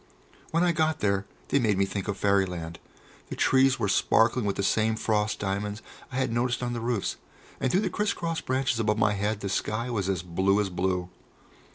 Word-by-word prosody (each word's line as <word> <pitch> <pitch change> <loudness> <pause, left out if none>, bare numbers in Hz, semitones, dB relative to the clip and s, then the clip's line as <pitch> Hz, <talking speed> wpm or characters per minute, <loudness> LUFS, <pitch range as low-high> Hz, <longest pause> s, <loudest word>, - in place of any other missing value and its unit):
When 165 +2 +2
I 175 - +4
got 160 -1 +1
there 100 -1 0 0.2
they 140 - +3
made 110 -6 +2
me 100 - +3
think 95 0 -4
of 100 -1 -2
Fairyland. 90 -5 0 0.5
The - - -4
trees 135 0 +4
were - - 0
sparkling 115 +4 +3
with 100 - 0
the 100 - -2
same 110 +2 +2
frost 110 -1 0
diamonds 100 +2 -3 0.3
I - - -7
had 130 -3 0
noticed 125 +1 0
on 120 0 -2
the 120 - -3
roofs, 115 -3 -1 0.4
and 130 - 0
through 190 - +3
the 200 - 0
criss 210 0 0
cross 165 -1 -3
branches 130 -2 0
above 105 -1 +1
my 105 -1 +3
head 105 +1 -1
the 100 - -3
sky 115 +5 -2
was 100 -5 -1
as 90 -3 -1
blue 95 +3 +1
as 100 -2 -1
blue. 90 0 -1
105 Hz, 210 wpm, -27 LUFS, 100-125 Hz, 0.5 s, I